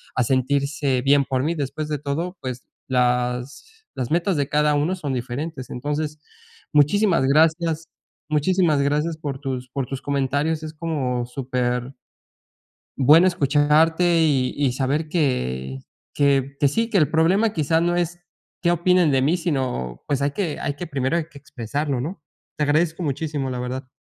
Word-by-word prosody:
a 130 - +2
sentirse 140 +1 0
bien 140 +1 +4
por 130 -1 -1
mí. 165 +3 0
Después 150 +1 -4
de 150 - -1
todo, 165 +6 -3
pues 125 -1 -5 0.2
las 125 - 0 0.3
las 125 +1 -3
metas 170 0 +1
de 140 - 0
cada 150 0 +2
uno 155 +6 +1
son 145 -7 -4
diferentes. 130 +3 -4
Entonces, 150 +3 -3 0.5
muchísimas 165 +1 +3
gracias 160 +3 +2 0.4
muchísimas 155 0 +2
gracias 150 +3 0
por 145 -4 -5
tus 130 -2 -4
por 130 -1 -3
tus 135 -1 -5
comentarios. 145 +3 0
Es 155 0 -6
como 135 -7 -2
súper 125 0 -2 1.1
bueno 155 +7 +7
escucharte 160 +2 +3
y 135 -5 +2
y 140 -3 +2
saber 140 +4 -1
que 65 - -1 0.3
que 140 -1 +2
que 145 - +4
sí, 225 +11 0
que 210 - +2
el 155 -4 +3
problema 190 +7 +3
quizás 160 -1 +1
no 175 0 +1
es 175 0 -1 0.4
qué 170 - +4
opinan 175 -2 +3
de 135 - +3
mí, 155 +7 +2
sino 130 - -2
pues 140 -1 0
hay 140 - +1
que 165 -2 -3
hay 145 - -2
que 175 +4 -7
primero 135 0 -1
hay 170 -2 0
que 145 - -14
expresarlo, 140 +1 -3
¿no? 155 +2 -6 0.3
Te 150 - 0
agradezco 160 +4 +1
muchísimo 145 -2 -2
la 125 - -4
verdad. 130 +1 -4
145 Hz, 160 wpm, -22 LUFS, 130-160 Hz, 1.1 s, bueno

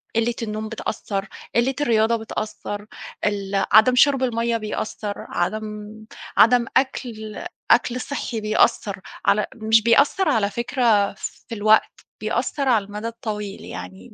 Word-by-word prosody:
قلة 230 +1 +2
النوم 215 0 -4
بتأثِّر، 200 -3 -4 0.3
قلة 245 +3 +2
الرياضة 225 -3 +3
بتأثِّر، 215 -2 -5 0.4
ال 200 -1 0
عدم 220 +5 +7
شُرب 270 0 +4
المَيّه 235 -1 0
بيأثِّر، 215 -1 -4
عدم 210 +3 -4 0.4
عدم 235 +1 +6
أكل 240 -3 -2 0.3
أكل 250 +1 +3
صحّي 245 -5 -4
بيأثِّر 215 -2 +1 0.2
على 210 +1 +3
مش 220 -1 +3
بيأثِّر 280 - +4
على 205 -3 +2
فكرة 235 -4 +2
في 230 - -7
الوقت، 215 +1 +2 0.2
بيأثِّر 250 +5 -1
على 220 -5 +3
المدى 210 +2 -5
الطويل، 210 -3 -5
يعني 90 +1 -9
220 Hz, 125 wpm, -22 LUFS, 210-235 Hz, 0.4 s, عدم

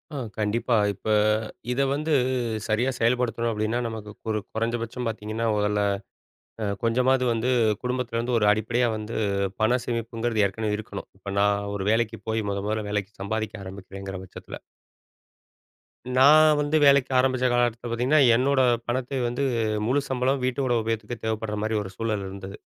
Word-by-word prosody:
ஆ, - - -3 0.2
கண்டிப்பா. 110 +3 +1 0.2
இப்ப 100 +2 -10 0.7
இத 125 - -1
வந்து, 155 +3 -1 0.6
சரியா 115 +4 +1
செயல்படுத்தணும் 120 0 +1
அப்படின்னா, 110 +2 -1
நமக்கு 110 -2 -6 0.2
ஒரு 110 - +1 0.2
கொறைஞ்சபட்சம் 115 +2 -2
பார்த்தீங்கன்னா, 110 +1 -3
மொதல்ல 105 0 +1 0.8
அ - - 0 0.2
கொஞ்சமாது 125 +3 +2
வந்து, 120 +3 0 0.3
குடும்பத்துலேருந்து 125 -1 -1
ஒரு 105 - +3
அடிப்படையா 115 +3 +1
வந்து, 110 +1 -6 0.5
பணம் 120 +2 +2
சேமிப்புங்கிறது 115 -1 -1
ஏற்கனவே 105 +1 -2
இருக்கணும். 105 -2 -8
இப்ப 100 +1 -6
நான் 100 0 +1
ஒரு 95 -1 -3
வேலைக்கு 115 0 0
போயி, 110 0 0
மொதமொதல்ல 105 +2 -2
வேலைக்கு 105 0 -2
சம்பாதிக்க 110 0 -3
ஆரம்பிக்கிறேங்கிற 95 0 -8
பட்சத்துல. 95 - -10 1.6
நான் 155 +3 +7
வந்து 145 +1 0
வேலைக்கு 140 -1 +5
ஆரம்பிச்ச 130 -1 +2
காலகட்டத்துல 120 -1 0
பார்த்தீங்கன்னா, 125 +6 +3 0.2
என்னோட 130 +2 +3 0.3
பணத்தை 130 +2 -2
வந்து, 120 +4 -2 0.4
முழு 140 +4 +2
சம்பளமும் 130 +1 0
வீட்டோட 130 0 0
உபயோகத்துக்கே 115 +1 -3
தேவைப்படுற 110 -1 -2
மாரி, 110 0 0
ஒரு 95 - -8
சூழல் 110 -3 -2
இருந்தது. 95 +1 -8
115 Hz, 135 wpm, -25 LUFS, 105-125 Hz, 1.6 s, நான்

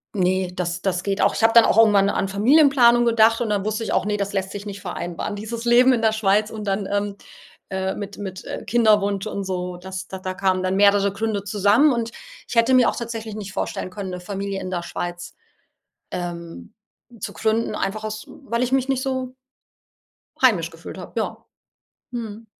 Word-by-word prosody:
ne, 185 -1 +1
das 175 -1 -3
das 180 -2 -1
geht 200 0 -1
auch - - +3
ich - - -2
habe 225 - +5
dann 230 -1 +8
auch - - +2
irgendwann 205 -3 +5
an 195 -1 0
Familienplanung 240 +2 +5
gedacht 230 0 +4
und 230 - -1
dann 205 -1 0
wusste 215 +1 -2
ich - - -2
auch: - - +1
„Ne, 210 0 0
das 200 0 -3
lässt 190 -1 -2
sich 205 +1 -7
nicht 200 -1 -7
vereinbaren“, 175 +2 -4
dieses 230 +3 -6
Leben 250 +2 +6
in 230 - 0
der 220 -1 +3
Schweiz 210 0 +2
und 215 -1 -6
dann, 195 0 -1
ähm, 205 0 -1 0.6
äh, 190 0 -1
mit 205 -1 -7
mit, 190 -2 -7
äh, - - -6
Kinderwunsch 210 -3 +2
und 200 -2 -4
so, 180 -1 -3
das 185 +1 -7
da 190 - -6
da 185 0 -4
kamen 185 -1 +1
dann 185 +1 0
mehrere 200 0 +4
Gründe 210 -1 -2
zusammen 205 +8 +3
und 230 -1 -2 0.4
ich - - -6
hätte 230 +3 +4
mir 250 -2 +5
auch - - -3
tatsächlich 225 -2 -5
nicht 200 -2 -7
vorstellen 185 - -3
können, 195 -1 -6
'ne 180 - -5
Familie 195 +1 -4
in 185 - -5
der 175 -1 -2
Schweiz, 175 0 -6 0.8
ähm, 170 - -6 0.5
zu - - -5
gründen, 220 +1 0
einfach 215 +2 -3
aus 215 0 -5
weil 240 -3 -4
ich 250 - 0
mich 270 0 +2
nicht 260 -1 0
so 260 -1 -3 1.1
heimisch - - +3
gefühlt - - -10
habe. - - -9
Ja. - - -4 0.7
Mhm. 225 -2 -6
205 Hz, 200 wpm, -22 LUFS, 190-225 Hz, 1.1 s, dann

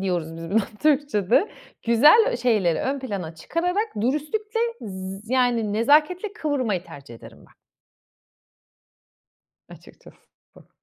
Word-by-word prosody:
diyoruz 175 -4 -3
biz 165 0 -8
buna 220 +3 +3 0.2
Türkçede. 285 - +2 0.3
Güzel 295 - +6
ö - - -1
şeyleri 215 -9 +1
ön 275 +1 -2
plana 195 -10 -5
çıkararak 360 - -2
dürüstlükle 310 - -2 0.2
z 195 +2 -8
yani 240 -5 +1
nezaketle 305 - +2
kıvırmayı 255 - -2
tercih 140 -4 -12
ederim 115 - -14
ben. - - -21 2.1
Açıkçası - - -16 0.4
bu. - - -18
235 Hz, 110 wpm, -23 LUFS, 190-300 Hz, 2.1 s, Güzel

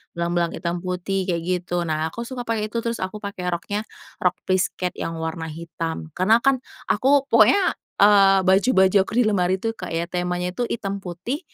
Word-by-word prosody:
belang-belang 170 0 0
hitam 170 +1 -3
putih, 185 +1 -2
kayak 170 -2 0
gitu, 175 -1 -1
nah 155 0 0
aku 235 +5 -6
suka 255 -2 -5
pakai 220 -2 -1
itu, 230 - -5
terus 230 0 -2
aku 185 +3 -4
pakai 195 -3 -5
roknya 180 +4 -2 0.4
rok 180 -1 +2
plisket 185 -1 0
yang 165 - -3
warna 160 0 -4
hitam. 165 0 -5
Karena 215 - +3
kan 270 -2 +3 0.3
aku 275 +5 +3
pokoknya, 230 - +6 0.4
eee, 195 -2 +6
baju-baju 190 +1 +4
aku - - -7
di 245 - +5
lemari 185 -3 +2
tuh 225 +4 -2
kayak 170 -5 -4
temanya 180 0 -2
itu 240 +5 -2
hitam 200 -3 -3
putih, 185 - -5
185 Hz, 175 wpm, -23 LUFS, 175-215 Hz, 0.4 s, pokoknya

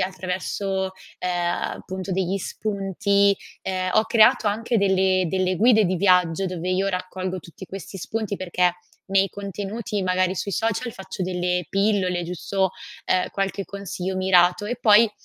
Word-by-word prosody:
attraverso, 190 +1 -2 0.3
ehm, 175 -1 -1 0.3
appunto 190 0 -5
degli 190 +1 0
spunti. 200 0 +1 0.3
Ehm, 185 -1 -2
ho 215 - +4
creato 220 -1 +5
anche 225 +2 0
delle 190 -1 +3
delle 185 0 0
guide 220 +1 +5
di 185 0 +1
viaggio, 180 -1 +3
dove 180 0 -3
io 190 +2 +1
raccolgo 185 0 -3
tutti 175 +3 -12
questi 195 +1 -8
spunti, 215 +1 -3
perché 180 -1 +1 0.3
nei 195 0 +3
contenuti, 200 +2 -4
magari 185 0 +1
sui 200 +1 -3
social 225 +6 -1
faccio 190 -1 -6
delle 180 -1 -1
pillole, 195 -3 +1
giusto, 185 +2 -1 0.3
ehm, 185 0 +1
qualche 195 0 -2
consiglio 190 -1 -4
mirato, 185 +1 +4
e 245 +4 -3
poi 220 -1 +5
190 Hz, 140 wpm, -23 LUFS, 185-200 Hz, 0.3 s, creato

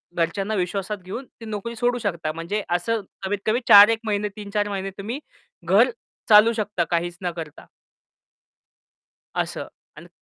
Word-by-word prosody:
घरच्यांना 195 +5 -1
विश्वासात 195 +3 -2
घेऊन, 235 +8 -6
ती 230 - -14
नोकरी 220 +2 -5
सोडू 245 +2 +1
शकता. 170 -7 -2
म्हणजे 170 +6 -3
असं 195 +6 0 0.2
कमीत-कमी 205 +4 0
4 205 +1 +10
एक 225 -1 +1
महिने 210 -1 0
3-4 205 0 -2
महिने 195 -1 -3
तुम्ही 220 +7 -4 0.5
घर 205 +8 +5 0.4
चालवू 215 +2 +7
शकता, 210 -5 -1
काहीच 175 +1 -2
न 175 -1 -1
करता. 155 -3 -8 1.7
असं. - - -3 0.3
आणि - - -11
205 Hz, 140 wpm, -23 LUFS, 180-220 Hz, 1.7 s, 4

